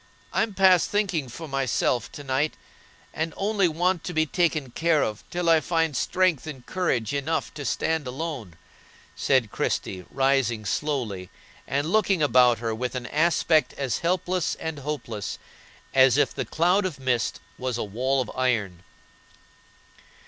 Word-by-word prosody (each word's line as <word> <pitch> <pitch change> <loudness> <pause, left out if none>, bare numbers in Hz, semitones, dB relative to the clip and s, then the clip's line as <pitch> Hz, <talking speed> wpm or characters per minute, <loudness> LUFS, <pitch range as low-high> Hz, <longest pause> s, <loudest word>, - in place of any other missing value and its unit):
I'm 220 -3 0
past 185 -3 +5
thinking 185 -10 0
for 160 +7 -8
myself 135 -3 0
to 145 - -8
night, 135 +3 0 0.6
and 160 0 -3
only 200 -2 +2
want 175 +2 0
to 180 - -4
be 160 0 +3
taken 155 -4 0
care 160 +2 +2
of 105 0 -3
till 175 -1 -2
I 165 -1 +6
find 165 -2 0
strength 180 -4 +1
and 135 -5 -8
courage 140 -10 -1
enough 150 +3 -1
to 145 - -6
stand 160 +3 -1
alone," 130 - -5 0.6
said 130 -6 +2
Christie, 90 -2 -2
rising 135 -5 +1
slowly 110 -7 -2 0.4
and 145 +4 -1
looking 195 -6 +3
about 125 -3 +5
her 115 -1 -2
with 125 +3 -3
an 125 -1 -4
aspect 155 -1 +2
as 130 -6 -2
helpless 180 0 0
and 160 -2 -5
hopeless 130 -8 -4 0.6
as 130 -1 +6
if 145 - +2
the - - -3
cloud 180 +5 +2
of 180 -7 -3
mist 125 -8 0 0.2
was 125 -2 -2
a - - -2
wall 130 +6 0
of 120 - -5
iron. 110 -9 0
145 Hz, 150 wpm, -25 LUFS, 125-165 Hz, 0.6 s, I